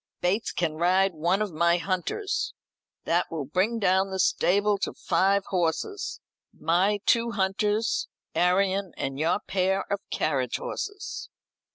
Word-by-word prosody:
Bates 195 +6 0
can 160 -3 -1
ride 185 +3 +3
one 175 +6 +1
of 205 -5 -5
my 170 +2 +3
hunters. 185 - -2 0.5
That 175 +1 +1
will 155 -4 -4
bring 185 - 0
down 190 -2 +2
the 190 - -3
stable 200 +2 +2
to - - -2
five 195 +3 +1
horses 185 - -1 0.3
my 190 +5 +1
two 235 -1 +3
hunters, 205 +3 0 0.3
Arion, 190 +1 +2
and 135 0 -3
your 170 +6 +1
pair 190 0 0
of 200 - -1
carriage - - 0
horses." 420 -5 -5
190 Hz, 135 wpm, -27 LUFS, 175-205 Hz, 0.5 s, ride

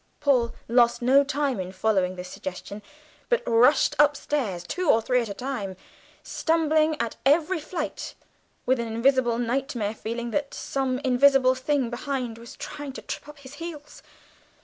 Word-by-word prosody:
Paul 255 -5 +2
lost 240 0 +3
no 270 +3 +5
time 280 -4 -1
in 185 0 -4
following 190 -1 0
this 180 0 -7
suggestion, 190 +3 -7 0.5
but 485 0 +2
rushed 245 +5 +4
upstairs, 285 -10 +1
two 360 - -2
or 225 - +6
three 250 +3 +1
steps 230 -3 -3
at 200 - -6
the 250 - -7
time, 205 -9 -4 0.5
stumbling 315 -1 +1
at 230 -1 -2
every 320 +6 +3
flight, 320 +2 -5 0.5
with 260 0 +2
a - - 0
hideous 230 +4 +2 0.2
nightmare 240 -3 -1
feeling 235 +2 -5
that 285 +3 -2
some 265 -2 -2
invisible 260 0 +5
thing 260 -1 -1
behind 245 -2 -3
was 235 0 -11
trying 290 -2 -7
to - - -9
trip - - -6
up 295 - -12
his 275 -1 -13
heels. 315 -3 -8
255 Hz, 160 wpm, -25 LUFS, 230-290 Hz, 0.5 s, or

